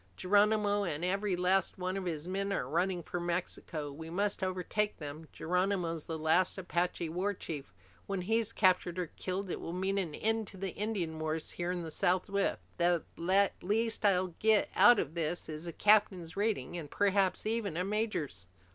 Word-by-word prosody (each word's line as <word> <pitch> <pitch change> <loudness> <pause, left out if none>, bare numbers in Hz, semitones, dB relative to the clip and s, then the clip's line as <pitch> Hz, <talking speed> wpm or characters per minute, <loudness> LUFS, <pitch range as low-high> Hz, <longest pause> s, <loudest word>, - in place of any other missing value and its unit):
Geronimo 205 +1 +3
and 170 -2 -2
every 195 +1 0
last 185 +2 +1
one 185 0 -2
of 195 -1 -3
his 160 -2 -3
men 195 +2 -1
are 125 - -1
running 175 +4 0
for 175 - -4
Mexico. 170 -3 -3
We 160 +3 -8
must 200 +4 -1
overtake 190 +3 -1
them. 155 +1 -7
Geronimo's 180 -2 -1
the 160 - -4
last 160 +5 +2
Apache 175 -2 -1
war 190 +5 -1
chief! 145 - -6 0.4
When 195 -2 -2
he's 225 +3 +1
captured 185 -4 +2
or 180 -3 -3
killed, 185 0 -3
it - - -3
will 165 - -5
mean 190 +2 0
an 170 -6 -3
end 225 -1 0
to 195 0 -5
Indian 190 -7 -3
wars 155 0 -3
here 175 0 -2
in 180 -1 -3
the 160 - -6
Southwest! 190 +4 +1 0.2
The 175 -1 +3 0.6
least 220 +4 0
I'll 185 -3 +3
get 220 -1 +3
out 240 -1 +8
of 155 - -1
this 170 0 -2
is 155 +2 -6
a - - -2
captain's 190 -4 +3
rating, 200 - -1
and 150 -3 -8
perhaps 195 0 +2
even 215 -6 -1
a 180 - +1
major's!" 195 - -2
185 Hz, 175 wpm, -32 LUFS, 165-200 Hz, 0.6 s, out